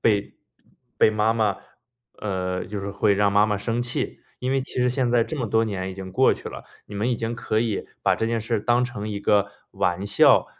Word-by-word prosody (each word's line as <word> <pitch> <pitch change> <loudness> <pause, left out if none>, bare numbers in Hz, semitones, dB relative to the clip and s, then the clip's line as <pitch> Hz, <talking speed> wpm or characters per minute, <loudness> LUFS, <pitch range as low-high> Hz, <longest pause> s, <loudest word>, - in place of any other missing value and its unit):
被 105 -2 +1 0.6
被 - - +5
妈 110 +1 +2
妈 105 -3 +2 0.6
呃， 95 -2 -2
就 105 -1 -5
是 100 - -4
会 100 0 +2
让 100 0 +3
妈 100 +1 +5
妈 105 -1 0
生 115 +3 -1
气。 125 0 -3 0.2
因 130 - -1
为 135 - +2
其 - - -10
实 125 - +3
现 125 -1 0
在 120 -1 +4
这 155 +6 -4
么 125 - -1
多 110 +1 +2
年 95 -2 -3
已 - - -8
经 95 -1 -7
过 - - +4
去 - - -6
了， - - -9 0.2
你 105 - -10
们 110 +5 0
已 - - +2
经 115 +1 -3
可 110 -1 -1
以 115 -4 -1 0.2
把 - - +3
这 110 - -2
件 115 0 0
事 115 +1 -1
当 120 +3 +2
成 120 -4 -5
一 100 -1 -4
个 100 -1 +2 0.2
玩 90 +3 0
笑 100 - +5
105 Hz, 250 characters per minute, -24 LUFS, 100-115 Hz, 0.6 s, 被